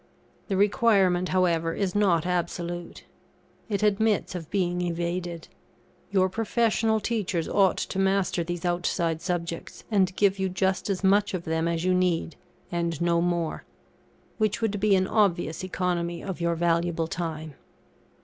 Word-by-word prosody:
The 195 - -1
requirement, 195 -3 +3
however, 165 -3 +1
is 195 -3 -1
not 185 -6 +2
absolute; 175 -1 -3 0.7
it 205 -1 -1
admits 210 -1 +2
of 170 -4 -6
being 180 -2 0
evaded. 170 0 -3 0.6
Your 190 -2 +3
professional 220 +2 +1
teachers 205 -7 -1
ought 195 -2 +3
to 190 - -3
master 195 -2 +1
these 175 +1 -4
outside 175 -2 0
subjects, 170 -2 -4
and 190 -3 +2
give 200 -1 +2
you 190 0 0
just 190 +2 0
as 195 0 -2
much 200 +1 +3
of 175 - -4
them 160 0 -1
as 170 0 -1
you 185 - +3
need, 180 -2 0 0.4
and 170 -3 -1
no 170 0 +2
more; 170 -2 -1 0.8
which 215 -1 +1
would 215 -3 -1
be 205 -1 +4
an 190 0 +2
obvious 175 -7 +1
economy 175 -2 -2
of 190 -3 -5
your 170 0 +1
valuable 170 0 +1
time. 160 -2 -5
180 Hz, 145 wpm, -26 LUFS, 170-195 Hz, 0.8 s, be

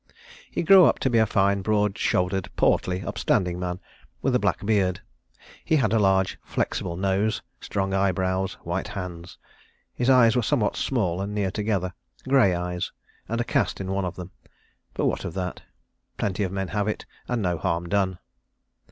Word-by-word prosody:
He - - -2
grew 185 +1 +8
up - - +3
to 130 - 0
be 115 - +4
a 110 - +4
fine, 100 -1 +2
broad 105 0 +1
shouldered, 95 -2 0
portly, 90 +1 +1
upstanding 90 -1 0
man, 90 0 -3 0.4
with - - +2
a - - +4
black - - 0
beard; 100 -4 +2 0.6
he 160 - +2
had 115 -8 +2
a 115 - +4
large, 95 -2 +2
flexible 85 - -2
nose, 100 +3 0 0.2
strong 95 -1 -2
eyebrows, 95 0 0
white 85 +3 -2
hands. 90 -2 -7 0.6
His 125 +1 0
eyes 125 -3 +6
were 125 - +3
somewhat 105 -1 +1
small 95 -9 0
and 100 +1 -4
near 100 -2 0
together; 100 -3 -1 0.3
grey 130 -9 +4
eyes, 90 0 -3 0.4
and 115 +1 -1
a - - +2
cast - - 0
in 95 -1 -4
one 95 -1 0
of 90 - -4
them. 90 0 -8 0.6
But - - 0
what - - 0
of 80 - -5
that? 90 -1 -4 0.6
Plenty 100 -1 -1
men 95 0 -3
have 105 +2 -1
it, 110 - -3 0.2
and 120 -3 -1
no 90 -3 0
harm 85 -1 -1
done. 95 -1 0
95 Hz, 175 wpm, -25 LUFS, 90-105 Hz, 0.6 s, grew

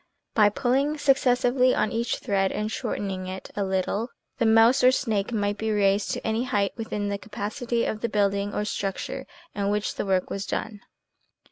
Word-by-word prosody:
By 210 -2 +5
pulling 275 +6 +1
successively 255 -2 +3
on 215 - +1
each 235 0 -1
thread 195 -4 0
and 215 +1 -2
shortening 195 -6 -3
it 185 0 -7
a 205 - 0
little, 190 +4 -1 0.3
the 230 - +3
mouse 225 +4 +5
or 255 - +7
snake 220 -6 -1
might 205 -2 -1
be 220 - -1
raised 200 -1 +2
to - - -5
any 225 +3 0
height 200 -5 0
within 210 -3 -3
the 200 0 -2
capacity 225 +3 -3
of 215 - -3
the 235 - -1
building 200 -1 +1
or 210 - -2
structure 195 -2 -4 0.3
in 200 -1 -1
which 210 0 -1
the - - -3
work 185 -1 +1
was 200 0 -4
done. 215 -2 -3
210 Hz, 180 wpm, -26 LUFS, 200-240 Hz, 0.3 s, or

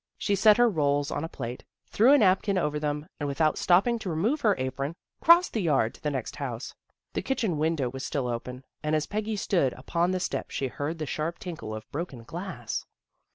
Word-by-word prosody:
She 205 - 0
set 205 +2 +6
her 240 0 +6
rolls 145 -6 +1
on 145 - -2
a 165 - -4
plate, 120 -3 -6 0.2
threw 235 +6 +4
a 290 - +8
napkin 195 -2 +3
over 150 -4 0
them, 150 0 -2
and 145 - -2
without 155 +2 +1
stopping 200 +7 +3
to 205 - -4
remove 215 - 0
her 210 -3 +4
apron, 135 +4 -3 0.3
crossed 340 +2 +6
the 220 - 0
yard 140 -9 +2
to - - -17
the 150 - 0
next 130 -5 -4
house. 125 -5 -5 0.4
The - - -1
kitchen 220 - -1
window 155 -4 +1
was 130 +2 -6
still 135 -4 -2
open, 125 +2 -5 0.2
and 150 +1 0
as 155 0 +1
Peggy 215 +1 -2
stood 175 -9 +1
upon 170 +6 -1
the 185 0 0
steps - - -3
she 135 - -1
heard 145 +6 -3
the 155 - -3
sharp 155 +4 -3
tinkle 160 -12 -6
of 110 - -8
broken 140 -6 -5
glass. 165 - -5
155 Hz, 210 wpm, -27 LUFS, 140-195 Hz, 0.4 s, a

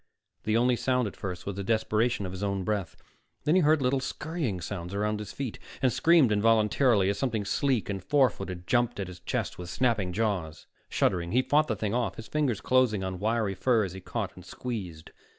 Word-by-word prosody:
The 110 +1 +2
only 125 +1 +3
sound 125 -1 +1
at 100 - -7
first 90 -2 -5
was 100 - -4
the 100 - -4
desperation 110 +1 +1
of 90 - -4
his 95 +1 -7
own 100 -2 -1
breath; 100 -3 -2 0.5
then 150 - +2
he 185 - +5
heard 155 -2 +3
little 130 +2 +2
scurrying 135 - -3
sounds 90 +1 -5
around 105 +1 0
his 105 -1 -6
feet, 130 +2 -5 0.2
and 130 -3 +2
screamed 165 -8 +5
involuntarily 110 0 +3
as 100 0 -1
something 110 -6 -1
sleek 125 +3 +1
and 95 -3 -4
four 135 +1 +4
footed 95 -3 -7
jumped 120 -1 +1
at 100 - -1
his 90 -1 -10
chest 90 - -3
with 90 -1 -6
snapping 110 -4 +1
jaws. 90 -6 -2 0.2
Shuddering, 85 -2 0
he 130 +2 +4
fought 150 +3 +3
the 110 - 0
thing 105 +1 -2
off, 115 -5 0
his 110 - -9
fingers 135 -9 0
closing 125 -6 +2
on 95 -1 -4
wiry 110 -1 0
fur 115 +2 +2
as 95 -3 -4
he 95 - -8
caught 100 +1 -4
and 90 - -12
squeezed. 90 -5 -6
105 Hz, 210 wpm, -28 LUFS, 95-125 Hz, 0.5 s, he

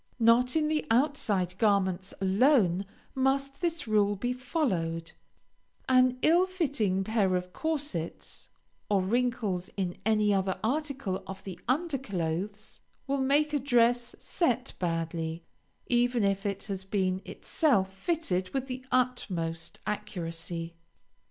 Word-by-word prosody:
Not 235 +3 +4
in 310 -1 +2
the 310 0 +1
outside 225 - +1
garments 195 -3 +2
alone 195 - +3 0.3
must 270 +1 0
this 335 -6 0
rule 205 -1 +3
be 245 +5 -1
followed, 180 - -2 0.8
an 255 -1 +4
ill 345 +4 +5
fitting 270 - 0
pair 200 -3 +1
of 180 0 -3
corsets, 290 - -3 0.4
or 200 -2 +3
wrinkles 215 -4 0
in 180 -3 -1
any 215 -1 +3
other 190 -1 0
article 270 -6 -1
of 190 0 -8
the 190 -3 -7
under 285 +2 0
clothes, 200 -1 -4 0.3
will 275 0 0
make 295 +3 +2
a 290 - +2
dress 240 -2 +2
set 255 - 0
badly, 165 -1 -2 0.4
even 245 -1 +2
if 195 +1 +1
it 200 -1 -3
has 195 -2 -4
been 190 -1 0
itself 200 - 0
fitted 195 - -1
with 270 -1 0
the 255 -1 -6
utmost 185 -10 -1
accuracy. 170 -5 -4
215 Hz, 125 wpm, -29 LUFS, 185-265 Hz, 0.8 s, ill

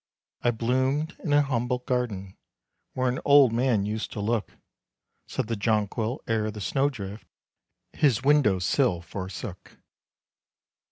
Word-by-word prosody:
"I 120 - +2
bloomed 130 +7 0
in 155 - -2
an 145 0 +5
humble 125 -2 -1
garden, 120 -7 -3 0.6
Where 130 0 0
an 125 +1 0
old 140 -4 +6
man 120 -4 +2
used 110 +1 -3
to 110 - -5
look," 110 +1 -2 0.7
Said 130 - -2
the 115 +1 -2
Johnquil, 110 +3 -1
"ere 110 -1 0
the 105 0 -7
snow 135 +8 +1
drift 105 -5 -8 0.7
His 130 -5 +2
window 140 -9 +4
sill 90 0 +1
forsook." 95 +2 -7
120 Hz, 130 wpm, -26 LUFS, 105-130 Hz, 0.7 s, old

